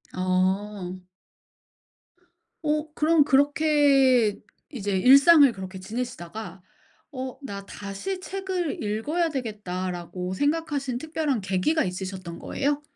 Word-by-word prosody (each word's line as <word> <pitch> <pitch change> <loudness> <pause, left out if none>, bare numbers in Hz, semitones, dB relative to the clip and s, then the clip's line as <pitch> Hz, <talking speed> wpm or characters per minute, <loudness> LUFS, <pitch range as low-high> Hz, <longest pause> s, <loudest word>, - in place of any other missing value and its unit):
어. 185 0 -1 1.6
어 300 +1 0
그럼 310 -1 +3
그렇게 280 -5 +4 0.3
이제 205 -7 -2
일상을 275 - +7
그렇게 190 -2 -8
지내시다가 195 -4 -6 0.5
'어 260 -2 -6
나 200 -5 -7
다시 205 - -6
책을 375 -4 -3
읽어야 255 +12 -1
되겠다.'라고 185 - -4
생각하신 285 - -1
특별한 310 -4 -2
계기가 195 - +1
있으셨던 185 -2 -5
거예요? 285 +1 -1
240 Hz, 235 characters per minute, -25 LUFS, 190-295 Hz, 1.6 s, 일상을